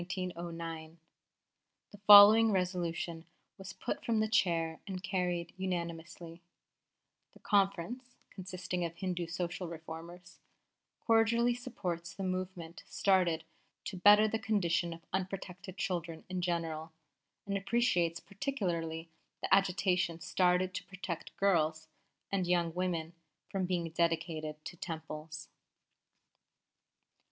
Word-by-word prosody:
_ 170 -3 -5 1.0
"The 205 - -13
following 210 +2 +10
resolution 175 -3 -1 0.4
was 195 0 -8
put 190 - -4
from 225 -2 +1
the 215 - +2
chair 165 -6 +1
and 185 -1 -5
carried 180 -3 -1
unanimously: 170 -2 -5 0.9
'The - - -18
Conference 205 +5 0 0.2
(consisting 185 -1 -4
of 170 -1 -3
Hindu 180 -2 -3
Social 175 +2 -3
Reformers) 165 +2 -9 0.7
cordially 230 +1 +4
supports 180 -9 -5
the 195 - -5
movement 185 -2 -4
started 180 -5 +2 0.4
to 195 - -4
better 205 +4 +7
the 220 +1 -1
condition 175 -6 +1
of 165 0 -9
unprotected 190 0 -4
children 170 -3 -3
in 185 -1 -2
general, 165 -2 -2 0.5
and 200 - -2
appreciates 195 -6 +1
particularly 175 - -3 0.4
the - - +2
agitation 180 -3 +2
started 180 +1 +2
to - - -4
protect 185 -3 -6
girls 160 -5 +1 0.4
and 190 -3 0
young 170 -2 +1
women 175 -2 -2 0.4
from 190 -2 -1
being 175 -2 -1
dedicated 160 -2 -1
to - - -6
Temples.'" 155 -2 -7
180 Hz, 110 wpm, -33 LUFS, 165-195 Hz, 1.0 s, following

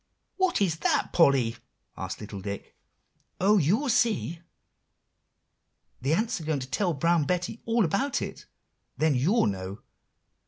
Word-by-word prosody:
"What 375 - +2
is 165 -4 0
that, 160 - 0
Polly?" 135 -8 +4 0.4
asked 95 0 -5
little 100 -2 -7
Dick. 100 +1 -6 0.6
"Oh, 205 +2 +4
you'll 200 - +2
see! 230 -9 +1 1.6
the 135 +5 +1
ants 220 -3 -1
are - - -8
going 155 -1 0
to 130 - -6
tell 170 +5 0
Brown 165 +1 +2
Betty 180 +7 -2
all 230 -2 +2
about 230 - 0
it; - - -7 0.5
then 155 -1 +3
you'll 160 - +3
know. 95 +1 -4
165 Hz, 135 wpm, -27 LUFS, 130-210 Hz, 1.6 s, Polly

